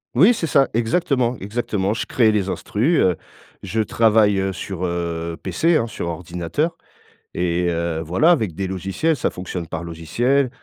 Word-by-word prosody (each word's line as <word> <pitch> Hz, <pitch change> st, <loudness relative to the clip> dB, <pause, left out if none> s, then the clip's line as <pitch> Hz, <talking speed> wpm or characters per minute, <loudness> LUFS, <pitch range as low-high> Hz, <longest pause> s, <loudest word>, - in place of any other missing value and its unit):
Oui, 185 Hz, -, +6 dB
c'est 190 Hz, -, -2 dB
ça, 140 Hz, -3 st, +3 dB
exactement, 120 Hz, 0 st, +1 dB
exactement. 105 Hz, -1 st, -1 dB
Je 115 Hz, -, -3 dB
crée 110 Hz, -4 st, +3 dB
les 100 Hz, -2 st, 0 dB
instrus, 130 Hz, -, 0 dB
heu, 90 Hz, -2 st, +3 dB, 0.5 s
je 100 Hz, +3 st, -2 dB
travaille, 110 Hz, -2 st, +3 dB
heu 95 Hz, 0 st, 0 dB
sur, 95 Hz, 0 st, -6 dB
heu, 85 Hz, -1 st, -3 dB
PC, 155 Hz, -, +2 dB
hein, 115 Hz, -, 0 dB
sur 85 Hz, -5 st, -5 dB
ordinateur 90 Hz, -, -3 dB, 0.6 s
et 90 Hz, 0 st, 0 dB
heu, 85 Hz, -1 st, -1 dB
voilà, 90 Hz, -, +3 dB
avec 110 Hz, -, +1 dB
des 95 Hz, +2 st, -2 dB
logiciels. 95 Hz, -, -1 dB
Ça -, -, 0 dB
fonctionne 90 Hz, -2 st, -6 dB
par 80 Hz, +1 st, -5 dB
logiciel 120 Hz, -, 0 dB
100 Hz, 165 wpm, -21 LUFS, 85-120 Hz, 0.6 s, Oui